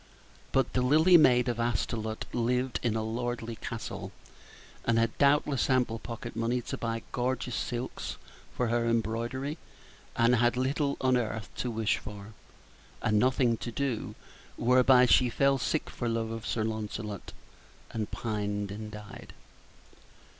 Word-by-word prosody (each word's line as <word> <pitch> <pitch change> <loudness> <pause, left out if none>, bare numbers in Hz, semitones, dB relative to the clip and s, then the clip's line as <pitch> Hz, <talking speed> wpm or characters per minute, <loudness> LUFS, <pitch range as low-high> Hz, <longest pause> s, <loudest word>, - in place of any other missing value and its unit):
But 135 - +1
the 125 - +2
lily 155 +8 +5
maid 125 -6 +6
of 120 -1 -1
Astolat 110 -1 -1
lived 125 +2 0
in 115 -3 0
a 110 - 0
lordly 115 0 -3
castle, - - -6 0.7
and 115 -1 +2
had 115 0 +1
doubtless 140 -1 +3
ample 125 -3 +2
pocket 115 -2 -7
money 115 +2 0
to 120 - -5
buy 115 -1 -2
gorgeous 125 0 -1
silks 120 +2 -4 0.4
for 125 -2 +1
her 115 0 +1
embroidery, 115 +6 -1 0.6
and 120 +1 +4
had 120 +1 +2
little 140 +2 0
on 130 -1 +3
earth 110 -3 -3
to 125 - -2
wish 110 -2 +1
for, 105 +1 -9 0.7
and 105 0 +3
nothing 125 -1 +3
to 120 - -5
do, 130 -2 -2 0.4
whereby 125 +1 +5
she 125 0 +5
fell 140 +3 +2
sick 150 +6 -1
for 120 - -3
love 115 -1 -1
of 115 0 -5
Sir 110 - 0
Lancelot, 110 -2 -4 0.6
and 110 -2 -3
pined 105 -2 -3
and 105 +1 -6
died. 105 -1 -10
120 Hz, 145 wpm, -29 LUFS, 110-125 Hz, 0.7 s, maid